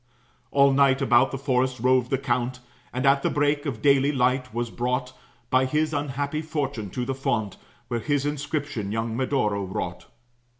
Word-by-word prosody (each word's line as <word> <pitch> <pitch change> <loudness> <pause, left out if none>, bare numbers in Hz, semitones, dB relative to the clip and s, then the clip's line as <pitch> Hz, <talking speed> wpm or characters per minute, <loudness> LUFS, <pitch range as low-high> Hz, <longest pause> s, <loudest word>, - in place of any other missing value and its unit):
All 140 0 +5
night 135 -1 +4
about 130 -2 +4
the 135 - -4
forest 130 -1 0
roved 130 0 +2
the 135 - +1
count, 125 -1 -1 0.3
And, 130 +2 -2
at 140 0 +4
the - - +1
break 145 +1 +1
of 115 -6 -4
daily 140 0 +4
light, 130 -2 +1
was 120 0 -3
brought 125 +1 -2 0.4
By 130 0 +4
his 155 +3 0
unhappy 145 +1 -2
fortune 140 -9 -3
to 125 +5 -3
the 135 - -2
fount, 110 -6 -2 0.3
Where 120 - -2
his 145 +2 0
inscription 145 -7 -3
young 110 +1 -2
Medoro 115 -6 0
wrought. 95 0 -5
130 Hz, 170 wpm, -25 LUFS, 120-140 Hz, 0.4 s, All